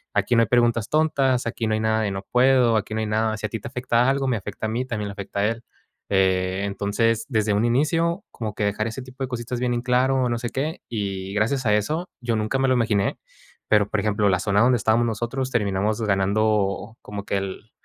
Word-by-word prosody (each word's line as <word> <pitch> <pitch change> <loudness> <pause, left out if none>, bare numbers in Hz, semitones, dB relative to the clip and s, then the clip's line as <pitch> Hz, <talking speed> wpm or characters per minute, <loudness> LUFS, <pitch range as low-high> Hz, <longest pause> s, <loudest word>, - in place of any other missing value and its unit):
aquí 120 - +2
no 115 - +5
hay - - -1
preguntas 120 -2 +2
tontas, 140 -5 +2
aquí 115 0 -2
no 110 - +1
hay - - -1
nada, 110 0 +1
de 105 -2 -1
no 95 0 -5
puedo, 125 -2 +4
aquí 110 0 -3
no 110 - -1
hay 110 - -2
nada, 110 0 0
si - - -4
a - - -16
ti 115 - -4
te - - -8
afecta 125 0 +1
algo, 135 0 0
me 120 -3 +1
afecta 105 +2 -6
a - - -3
mí, 120 +4 -2
también 110 -5 -3
le - - -6
afecta 100 0 -4
a - - +2
él. 115 +1 -3 0.5
Eh, 95 -1 +1
entonces, 105 +3 0
desde 110 -4 +1
un 105 +3 +2
inicio, 165 - +1
como 110 -3 -5
que, 105 - -1
dejar 105 +1 -1
ese 115 +4 -5
tipo 130 +1 -8
de 130 - -3
cositas 120 0 -4
bien 125 0 0
en 120 - -1
claro, 130 +1 +2
no 120 - 0
sé 120 0 -3
qué. 145 +6 -3
Y, 100 -3 -3
gracias 120 +5 0
a 105 - +3
eso, 155 - -1
yo 120 -2 -1
nunca 110 +4 -1
me 135 - +2
lo 130 - +3
imaginé. 105 -5 +1 0.5
Pero, 105 -1 +4
por 110 - 0
ejemplo, 105 -1 +1
la 90 -1 +2
zona 100 +1 +1
donde 125 +2 +5
estábamos 115 +2 +2
nosotros, 120 +4 -2
terminamos 105 -1 0
ganando 105 +1 0
como 100 -1 -7
que 100 - -1
el 100 +3 -6
110 Hz, 240 wpm, -23 LUFS, 105-125 Hz, 0.5 s, no